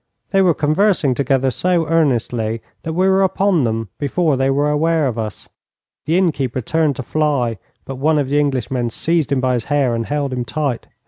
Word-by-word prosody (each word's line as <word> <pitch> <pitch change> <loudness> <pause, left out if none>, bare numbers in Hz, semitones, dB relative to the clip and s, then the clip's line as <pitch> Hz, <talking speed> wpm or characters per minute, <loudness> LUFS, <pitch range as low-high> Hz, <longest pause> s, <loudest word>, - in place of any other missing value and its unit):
They 195 - +3
were 180 -4 +3
conversing 155 0 +2
together 135 0 +1
so 175 +4 0
earnestly 120 -8 0 0.2
that 160 - -4
we 185 +3 +2
were 190 0 +3
upon 190 -5 +2
them 115 -2 -2
before 150 +1 +1
they 135 +1 +1
were 140 +2 +1
aware 160 +1 +1
of 120 -4 -2
us. 110 -2 -5 0.6
The 165 +3 +2
innkeeper 145 -9 0
turned 155 +3 0
to 130 - -5
fly, 130 -6 0 0.3
but 135 - -6
one 155 +3 +2
of 145 -3 0
the 145 +1 +2
Englishmen 130 -4 -1
seized 160 +4 0
him 140 - +2
by 130 -1 +1
the - - -9
hair, 140 -4 +1
and 115 -1 -2
held 145 -2 -2
him 125 -1 -2
tight. 135 0 -3
140 Hz, 195 wpm, -18 LUFS, 125-160 Hz, 0.6 s, They